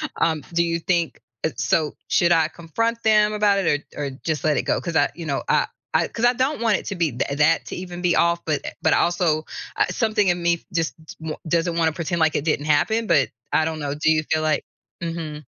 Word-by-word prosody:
Um, 160 Hz, -3 st, 0 dB
do 170 Hz, 0 st, +3 dB
you 170 Hz, 0 st, -1 dB
think 170 Hz, -1 st, 0 dB, 0.2 s
it 145 Hz, -6 st, -2 dB
so, 150 Hz, +5 st, +1 dB, 0.2 s
should 175 Hz, 0 st, +3 dB
I 160 Hz, -2 st, +4 dB
confront 230 Hz, +9 st, -2 dB
them 215 Hz, -1 st, +4 dB
about 205 Hz, -1 st, +3 dB
it 145 Hz, -6 st, +1 dB
or 145 Hz, -, -2 dB
or 140 Hz, -, -2 dB
just 155 Hz, -2 st, -2 dB
let 150 Hz, -2 st, +2 dB
it -, -, +1 dB
go? -, -, 0 dB
'Cause 170 Hz, -2 st, -4 dB
I, -, -, +4 dB
you 170 Hz, -2 st, -7 dB
know, 140 Hz, -3 st, -2 dB
I -, -, +3 dB, 0.3 s
I -, -, +3 dB
'cause 235 Hz, +1 st, -1 dB
I 245 Hz, -, +5 dB
don't 260 Hz, +2 st, -1 dB
want 225 Hz, -3 st, +3 dB
it -, -, -9 dB
to 200 Hz, -, -3 dB
be 165 Hz, -5 st, +1 dB
that 140 Hz, +4 st, -2 dB
that 160 Hz, +2 st, +3 dB
to -, -, -5 dB
even 180 Hz, -1 st, -7 dB
be 175 Hz, -1 st, +3 dB
off, 170 Hz, 0 st, +2 dB
but 150 Hz, -3 st, 0 dB
e -, -, -1 dB
but 160 Hz, -, +4 dB
also, 170 Hz, -3 st, +1 dB, 0.3 s
uh, -, -, +4 dB
something 215 Hz, -3 st, +1 dB
in 175 Hz, 0 st, +1 dB
me 170 Hz, 0 st, +1 dB
just 165 Hz, -1 st, 0 dB
t -, -, -10 dB
won 160 Hz, -1 st, -4 dB
doesn't 170 Hz, +1 st, +1 dB
want 165 Hz, -1 st, +2 dB
to 155 Hz, -, -7 dB
pretend 170 Hz, +1 st, -2 dB
like 160 Hz, -1 st, +2 dB
it 145 Hz, -, -1 dB
didn't 150 Hz, -2 st, 0 dB
happen, 220 Hz, +10 st, +2 dB
but 145 Hz, -6 st, +3 dB, 0.2 s
I 160 Hz, -, +3 dB
don't 160 Hz, -1 st, -3 dB
know, 145 Hz, -1 st, -3 dB
do 155 Hz, +1 st, +2 dB
you 155 Hz, 0 st, +2 dB
feel 155 Hz, 0 st, +2 dB
like 155 Hz, -1 st, +1 dB, 0.4 s
Mhm. 160 Hz, -3 st, -5 dB
165 Hz, 250 wpm, -23 LUFS, 155-180 Hz, 0.4 s, I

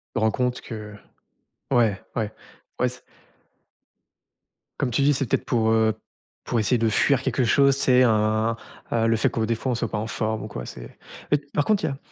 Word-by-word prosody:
Rends 110 Hz, -1 st, +2 dB
compte 125 Hz, -1 st, -1 dB
que 105 Hz, -3 st, -8 dB, 0.8 s
ouais, 115 Hz, -6 st, +2 dB
ouais, 110 Hz, -2 st, -1 dB, 0.5 s
ouais, -, -, +2 dB
c -, -, -13 dB, 1.8 s
Comme 125 Hz, -, 0 dB
tu 120 Hz, -, +1 dB
dis, 145 Hz, -, +4 dB
c'est 135 Hz, 0 st, -1 dB
peut-être -, -, 0 dB
pour, 110 Hz, -4 st, +1 dB
heu, 110 Hz, -1 st, +2 dB, 0.4 s
pour 120 Hz, -, -1 dB
essayer 115 Hz, +3 st, +2 dB
de 115 Hz, -, +2 dB
fuir 130 Hz, +5 st, +2 dB
quelque 130 Hz, -1 st, 0 dB
chose, 140 Hz, +3 st, +4 dB
tu 140 Hz, -, -3 dB
sais 130 Hz, 0 st, +5 dB
un 110 Hz, 0 st, +2 dB, 0.4 s
heu, 115 Hz, -1 st, +2 dB
le 115 Hz, -, +3 dB
fait 110 Hz, -, +2 dB
que, 115 Hz, -, -3 dB
des 115 Hz, +1 st, +1 dB
fois, 130 Hz, +3 st, -2 dB
on -, -, -1 dB
soit 115 Hz, -1 st, -3 dB
pas -, -, -1 dB
en 110 Hz, -, -3 dB
forme 110 Hz, -1 st, -2 dB
ou -, -, -5 dB
quoi, 60 Hz, -, -7 dB
c'est -, -, -10 dB, 0.3 s
et 145 Hz, -, +5 dB, 0.2 s
par 145 Hz, -, +1 dB
contre 210 Hz, -5 st, +2 dB
il -, -, +2 dB
y -, -, 0 dB
a 135 Hz, -, -5 dB
115 Hz, 215 wpm, -24 LUFS, 110-130 Hz, 1.8 s, sais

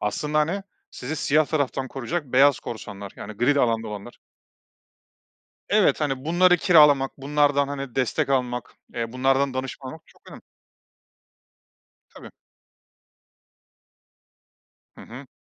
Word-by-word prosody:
aslında, 150 Hz, +9 st, -1 dB
hani, 170 Hz, +6 st, 0 dB, 0.3 s
sizi 150 Hz, +6 st, -6 dB
siyah 150 Hz, +2 st, +2 dB
taraftan 140 Hz, -3 st, -2 dB
koruyacak 140 Hz, +6 st, -4 dB
beyaz 135 Hz, +2 st, +4 dB
korsanlar, 100 Hz, -3 st, -8 dB
yani 110 Hz, -, -8 dB
gri 120 Hz, +7 st, +1 dB
de 140 Hz, -, +2 dB
alanda 115 Hz, -2 st, 0 dB
olanlar. 105 Hz, +3 st, -9 dB, 1.5 s
Evet, -, -, +3 dB
hani, 135 Hz, -2 st, -2 dB
bunları 180 Hz, +2 st, +4 dB
kiralamak, 150 Hz, -6 st, +5 dB
bunlardan, 140 Hz, 0 st, +1 dB
hani, 140 Hz, -3 st, -6 dB
destek 130 Hz, +1 st, 0 dB
almak, 125 Hz, -2 st, -2 dB, 0.2 s
eee, 115 Hz, -1 st, -4 dB
bunlardan 135 Hz, +1 st, +1 dB
danışmanlık 130 Hz, +3 st, -6 dB
çok -, -, -19 dB
önem -, -, -12 dB, 1.7 s
Tabii. -, -, -11 dB, 2.7 s
Hı -, -, -13 dB
hı. 130 Hz, +4 st, -11 dB
135 Hz, 115 wpm, -24 LUFS, 125-150 Hz, 2.7 s, kiralamak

